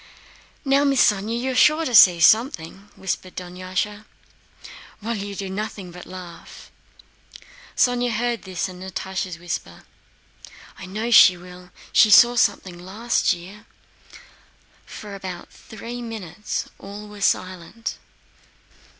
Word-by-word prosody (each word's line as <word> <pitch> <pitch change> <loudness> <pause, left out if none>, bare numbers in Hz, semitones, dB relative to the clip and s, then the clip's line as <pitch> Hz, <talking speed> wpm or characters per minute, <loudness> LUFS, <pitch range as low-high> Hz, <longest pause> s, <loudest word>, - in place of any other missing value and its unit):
"Now, 275 +1 +3
Miss 275 -5 +4
Sónya 230 +6 -3
is 250 - +1
sure 310 +2 +4
to 250 - -3
see 180 -5 +8
something," 200 - +2
whispered 185 -1 -5
Dunyásha; 185 +4 -4 0.9
"while 225 +2 -3
you 200 -1 -6
do 195 0 -5
nothing 195 -1 -6
but 180 +1 -11
laugh." 180 -2 -11 1.1
Sónya 245 -1 +2
heard 235 +1 -1
this 185 -2 -4
and 180 -1 -11
Natásha's 190 -1 -5
whisper: 175 +1 -6 1.0
"I 190 - -9
know 215 +5 -4
she 185 -5 +8
will. 180 0 -13 0.2
She 215 - +6
saw 240 +4 +7
something 185 -6 0
last 205 +5 0
year." 190 +5 -12 1.2
For 210 -1 -9
about 185 -3 -8
three 235 +3 -9
minutes 215 -4 -5
all 205 +2 -9
were 210 -1 -12
silent. 185 +4 -2
200 Hz, 120 wpm, -22 LUFS, 185-230 Hz, 1.2 s, see